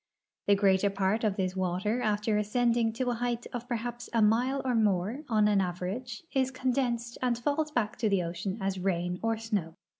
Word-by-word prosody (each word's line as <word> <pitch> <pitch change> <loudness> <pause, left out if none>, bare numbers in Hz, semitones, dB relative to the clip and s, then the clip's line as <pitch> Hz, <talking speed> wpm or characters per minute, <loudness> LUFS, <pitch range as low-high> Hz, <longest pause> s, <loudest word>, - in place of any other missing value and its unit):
The 200 - +6
greater 195 0 +3
part 200 +3 0
of 210 -3 +1
this 185 -2 -1
water 190 +6 0
after 210 0 +1
ascending 230 +2 +2
to 250 +1 -1
a - - 0
height 240 0 -2
of 245 0 -5
perha})S 240 0 -4
a 230 - +2
mile 245 +6 +3
or 255 - +1
more, 215 +4 +1
on 215 -2 +4
an 205 -2 +3
average, 190 - -4
is 265 -1 +2
condensed 245 -2 -1
and 245 -2 +1
falls 290 +5 0
back 235 -7 -1
to 220 - +2
the 195 -3 +2
ocean 180 +4 -3
as 195 -1 -2
rain 180 -1 -1
or 225 0 0
snow. 205 -8 -2
220 Hz, 190 wpm, -29 LUFS, 195-240 Hz, -, The